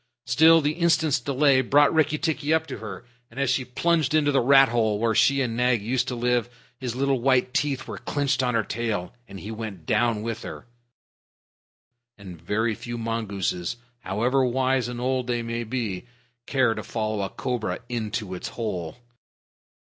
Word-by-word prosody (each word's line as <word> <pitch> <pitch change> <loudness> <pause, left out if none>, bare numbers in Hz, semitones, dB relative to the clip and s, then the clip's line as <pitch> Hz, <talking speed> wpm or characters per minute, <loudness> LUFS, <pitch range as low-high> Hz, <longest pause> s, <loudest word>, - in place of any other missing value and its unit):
Still, 165 +1 +6
the 145 0 +1
instant's 160 -3 +2
delay 135 +1 +3
brought 145 +3 +4
Rikki 155 -1 +2
tikki 155 -2 -1
up 160 0 +2
to - - -7
her, 105 -1 -8 0.2
and 115 - -10
as 140 -2 +2
she 130 0 +1
plunged 155 +4 +1
into 145 -2 +3
the 140 - +3
rat 135 +2 +6
hole 110 -3 +1
where 115 +1 +1
she 135 +5 +3
and 115 -3 -3
Nag 125 -1 +2
used 120 +3 0
to 125 - -3
live, 120 0 0 0.3
his 125 -3 -4
little 135 -1 0
white 130 -1 +2
teeth 140 -3 -1
were - - -6
clenched 140 -2 0
on 125 -2 0
her 115 - +2
tail, 110 -4 -3
and 100 -1 -9
he 105 - -7
went 110 -7 -7
down 110 +1 +1
with 115 0 -4
her - - -8 1.5
and 90 -5 -11
very 110 +6 0
few 120 +2 -6
mongooses, 110 -4 -2 0.2
however 120 +7 0
wise 130 0 +1
and 120 -1 -5
old 130 0 -1
they 120 -1 -1
may 115 0 -3
be, 115 -3 -4 0.4
care 130 -4 +2
to - - -5
follow 110 -2 -3
a 95 - -2
cobra 115 -8 -3
into 110 -4 -3
its 90 - -5
hole. 95 -6 -4
120 Hz, 180 wpm, -25 LUFS, 110-135 Hz, 1.5 s, Still